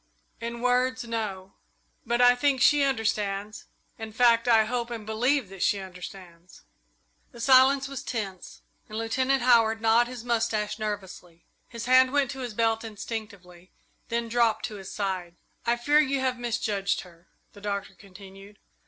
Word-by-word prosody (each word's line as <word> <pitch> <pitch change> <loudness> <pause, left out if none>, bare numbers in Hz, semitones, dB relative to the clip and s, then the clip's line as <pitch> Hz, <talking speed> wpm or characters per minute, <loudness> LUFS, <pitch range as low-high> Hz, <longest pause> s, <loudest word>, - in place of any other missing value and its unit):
"In 235 +1 -5
words, 250 +1 +1
no 210 -5 -5 0.5
but 240 +1 +1
I 245 0 +7
think 265 +1 +1
she 290 +3 +5
understands 215 -6 -1 0.3
in 220 -1 -6
fact, 235 0 +3
I 225 -2 +5
hope 240 +1 -3
and 230 -3 -6
believe 240 +2 0
that 195 -2 -10
she 205 - +2
understands." 180 -2 -11 0.7
The 235 - -14
silence 265 +2 +5
was 275 -1 -6
tense, 195 -6 -6 0.3
and 215 - -6
Lieutenant 260 +3 0
Howard 225 -3 +4
gnawed 225 +2 +3
his 245 -2 -8
mustache 225 -2 -1
nervously. 190 -5 -6 0.2
His 230 -1 -7
hand 255 +1 +5
went 280 -2 +1
to 265 - -8
his 245 -4 -6
belt 225 0 +1
instinctively, 200 -5 -8 0.4
then 235 0 -1
dropped 230 -1 +1
to 215 -3 -7
his 190 -1 -9
side. 185 -5 -3 0.3
"I 235 - +3
fear 290 +5 +3
you 275 -2 +1
have 260 -2 -1
misjudged 220 -5 -1
her," 175 -1 -17 0.3
the 205 - -14
Doctor 200 -1 -4
continued. 195 +1 -14
225 Hz, 155 wpm, -26 LUFS, 200-245 Hz, 0.7 s, I